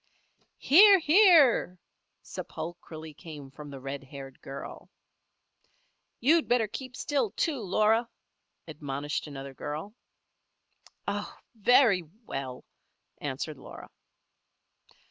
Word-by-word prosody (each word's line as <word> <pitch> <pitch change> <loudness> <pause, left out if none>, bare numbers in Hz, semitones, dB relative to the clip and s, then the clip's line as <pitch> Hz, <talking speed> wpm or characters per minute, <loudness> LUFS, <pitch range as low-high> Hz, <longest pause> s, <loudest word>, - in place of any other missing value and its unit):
"Hear! 395 +7 +7
hear!" 315 - +5 0.5
sepulchrally 160 -1 -8
came 145 -4 -10
from 145 +1 -10
the 140 -1 -8
red 135 +1 -6
haired 135 -1 -11
girl. 135 0 -9 1.3
"You'd 315 +6 +3
better 240 -3 +2
keep 255 +4 -8
still, 290 - 0
too, 295 -7 -1
Laura," 220 +4 +2 0.6
admonished 145 -1 -4
another 135 -1 -8
girl. 150 +9 -6 1.1
"Oh! - - -4 0.2
very 225 -3 +4 0.2
well!" 130 -6 -6 0.5
answered 145 +1 -4
Laura. - - -11
165 Hz, 90 wpm, -28 LUFS, -, 1.3 s, Hear